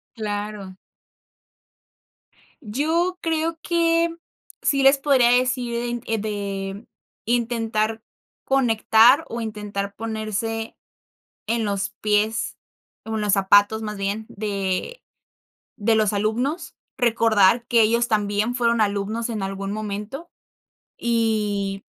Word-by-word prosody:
Claro. 205 -3 -5 1.9
Yo 320 - 0
creo 325 0 -1
que 335 0 +2 0.5
sí 275 -1 +2
les 270 +1 +6
podría 270 -4 +4
decir 245 -1 0
en 225 -2 -1
de 200 -1 -4 0.4
intentar 225 -2 0 0.4
conectar 245 +2 +4
o 235 - -4
intentar 210 -2 -4
ponerse 225 +1 -3 0.7
en 230 0 0
los 200 -1 -2
pies, 215 +1 0 0.5
o 220 0 -4
en 215 - -1
los 205 -2 +1
zapatos, 205 +2 +4
más 210 -1 -5
bien, 200 +2 -2
de 200 - -3 0.7
de 225 0 +1
los 215 -2 +2
alumnos, 230 - -1 0.2
recordar 230 -3 +3
que 235 -2 +4
ellos 235 +2 +3
también 210 +1 0
fueron 235 -2 +2
alumnos 210 +3 -1
en 215 -4 -3
algún 195 0 -4
momento, 215 +9 -5 0.7
y 210 -4 -1
220 Hz, 105 wpm, -23 LUFS, 205-240 Hz, 1.9 s, les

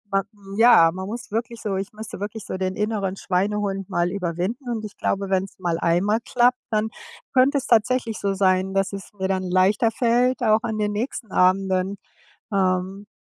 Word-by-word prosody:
ähm, 195 0 +1 0.3
ja, 225 -8 +7
man 190 +1 -5
muss 230 +2 -6
wirklich 230 +1 -3
so 205 -3 -2
ich 195 +1 -4
müsste 215 -3 -8
wirklich 210 0 -5
so 185 - -4
den 185 0 -2
inneren 210 -3 -1
Schweinehund 195 +1 -1
mal 175 +1 0
überwinden. 195 - -3
Und 220 -2 -3
ich 205 - -10
glaube, 195 0 -1
wenn's 190 0 -1
mal 170 -2 -1
einmal 190 +7 +2
klappt, 250 +1 +3
dann 215 +1 +1 0.4
könnte 265 +2 +4
es 270 - -3
tatsächlich 230 0 +2
so 200 -1 0
sein, 190 0 +2
dass 195 0 0
es 195 -1 -7
mir 190 -2 -2
dann 190 -1 -1
leichter 185 +5 +2
fällt, 245 +2 +2
auch 220 -2 +4
an 220 -2 -2
den 210 -1 0
nächsten 225 -1 -4
Abenden, 190 +1 +2 0.6
ähm, 190 +1 0
200 Hz, 180 wpm, -23 LUFS, 190-225 Hz, 0.6 s, ja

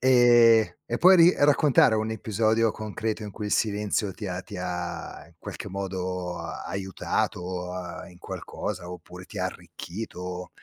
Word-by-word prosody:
Ehm, 120 -6 +6
e 120 - -2
puoi 185 +1 +8
ri 170 +1 +7
raccontare 145 -5 +5
un 110 0 -1
episodio 110 +1 +1
concreto 110 +1 -4
in 105 - -6
cui 105 +2 -6
il - - -2
silenzio 105 -1 0
ti 105 +2 -7
ha 90 0 -4
ti 105 -2 -9
ha, 90 -1 -5
in - - -22
qualche - - -7
modo, 90 -2 -4
aiutato, 90 -2 -3 0.3
ehm, - - -13
in 90 - -17
qualcosa 90 0 -6
oppure 90 +1 -10
ti - - -8
ha - - 0
arricchito? 90 -2 -7
105 Hz, 150 wpm, -26 LUFS, 90-115 Hz, 0.3 s, puoi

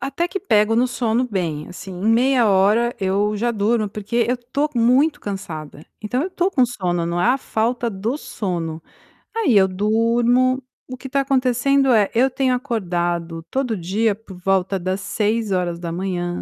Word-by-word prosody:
até 275 +6 -2
que 390 +2 -5
pego 215 - +3
no 240 +2 +3
sono 245 -1 0
bem 165 -7 -3
assim, 185 +1 -9
em 185 +4 -2
meia 245 0 +4
hora 210 +5 +3
eu 200 +2 0
já 240 +3 0
durmo, 215 0 0
porque 215 +4 -1
eu 250 - +1
tô 255 +5 -2
muito 265 +6 +3
cansada, 160 -7 -7 0.2
então 230 +4 -1
eu 355 - -2
estou 370 0 0
com 260 -9 +3
sono, 180 -7 -2
não 170 +1 -1
é 180 - +2
a 255 +2 +3
falta 235 0 -1
do 215 +6 -3
sono. 170 - -4 0.5
Aí 320 - +2
eu 190 -1 +5
durmo. 235 +6 +2 0.3
O 255 - -7
que 265 - -8
está 275 +1 +1
acontecendo 270 0 +2
é, 210 -3 +3
eu 255 +4 +3
tenho 260 0 0
acordado 175 -9 -2
todo 255 -5 -1
dia 200 +5 0
por 200 -3 -13
volta 195 0 +1
das 185 +1 -2
6h, 180 -4 -2
220 Hz, 170 wpm, -21 LUFS, 190-250 Hz, 0.5 s, eu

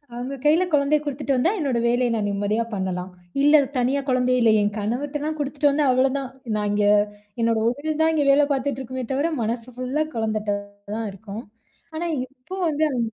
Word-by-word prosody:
அவுங்க 255 +3 -4
கையில 320 +5 +5
குழந்தைய 290 +1 +3
குடுத்துட்டு 280 -1 -1
வந்தா, 330 +9 +3
என்னோட 270 -7 0
வேலைய 245 +1 +2
நான் 210 -2 0
நிம்மதியா 205 +3 0
பண்ணலாம். 185 -1 -3 0.3
இல்ல 295 0 +6 0.2
தனியா 265 +3 +1
குழந்தை 255 0 +2
இல்லயே! 220 -2 +5
என் 205 0 0
கணவர்ட்டதான் 290 +8 -2
கொடுத்துட்டு 290 0 +1
வந்தேன், 280 -2 +3
அவ்ளதான். 265 +1 +1 0.3
நான் 210 -1 -1
இங்கே 205 0 +3 0.5
என்னுடைய 230 -1 +2
உடல் 305 +4 -3
தான் 320 0 +3
இங்கே 290 -2 +2
வேலை 290 +1 +5
பார்த்துட்டு 270 -1 -2
இருக்குமே 260 0 -5
தவிர, 295 +5 0
மனசு 230 +2 -2
ஃபுல்லா 255 +5 -1
குழந்தட்ட 215 -2 -1 0.4
தான் 225 -2 -3
இருக்கும். 210 +3 -8 0.5
ஆனா 335 +2 -2 0.2
இப்போ 270 +8 -10
வந்து 305 0 0
அது 250 - -1
255 Hz, 175 wpm, -23 LUFS, 225-290 Hz, 0.5 s, இல்ல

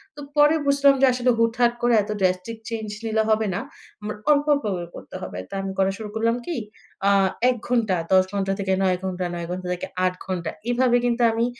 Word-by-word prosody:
তো 290 - -9 0.2
পরে 295 +2 +6
বুঝলাম 280 0 +5
যে, - - +7
আসলে 250 0 +2
হুটহাট 235 +1 +2
করে 240 0 +3
এত 205 - -11
ড্রাস্টিক 185 +4 0
চেঞ্জ 220 -2 -4 0.2
নিলে 220 0 +1
হবে 220 0 +2
না। 180 - -1 0.4
উম 210 - -6 0.2
অল্প, 290 0 +3
অল্প 285 - -1
করে 175 -1 -5
করতে - - -11
হবে। 90 - -6
তো - - -11
আমি 195 0 -4
করা 190 0 +3
শুরু 215 -1 -7
করলাম 230 +1 +1
কি? 340 - -3 0.5
আ - - +5 0.4
১ 255 - +1
ঘণ্টা, 230 -6 +1 0.2
১০ 185 0 +6
ঘন্টা 195 -1 -1
থেকে 190 -1 0
৯ 185 -1 +2
ঘণ্টা, 185 -1 -2
৯ 170 -1 -5
ঘন্টা 180 0 -4
থেকে 180 - -5 0.2
৮ 180 - +1
ঘণ্টা। 175 -4 -3 0.2
এভাবে 245 0 +3
কিন্তু 240 0 0
আমি 230 +1 +1
220 Hz, 210 wpm, -23 LUFS, 190-245 Hz, 0.5 s, যে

